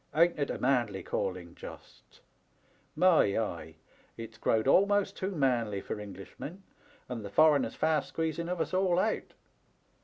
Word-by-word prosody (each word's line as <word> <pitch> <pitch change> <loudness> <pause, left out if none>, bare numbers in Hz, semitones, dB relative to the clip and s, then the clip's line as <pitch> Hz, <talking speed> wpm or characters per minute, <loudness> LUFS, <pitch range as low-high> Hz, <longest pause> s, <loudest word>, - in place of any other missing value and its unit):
Ain't 170 0 +4
it 140 - 0
a - - -2
manly 120 -7 0
calling, 90 -3 -3
just! - - -13 0.7
My 170 - +4
eye! 85 -8 -3 0.4
It*s 115 -1 -9
growed 110 +1 +1
almost 200 +6 +3
too 190 - -3
manly 125 - 0
for 105 - -5
Englishmen, 105 - -9 0.4
and 120 -3 -5
the 100 - -6
foreigner's 155 +5 +4
fast 155 -1 +1
squeezing 165 +1 -2
of 180 -1 -2
us - - -2
all 185 -2 +2
out. 220 +4 -1
140 Hz, 145 wpm, -30 LUFS, 105-170 Hz, 0.7 s, Ain't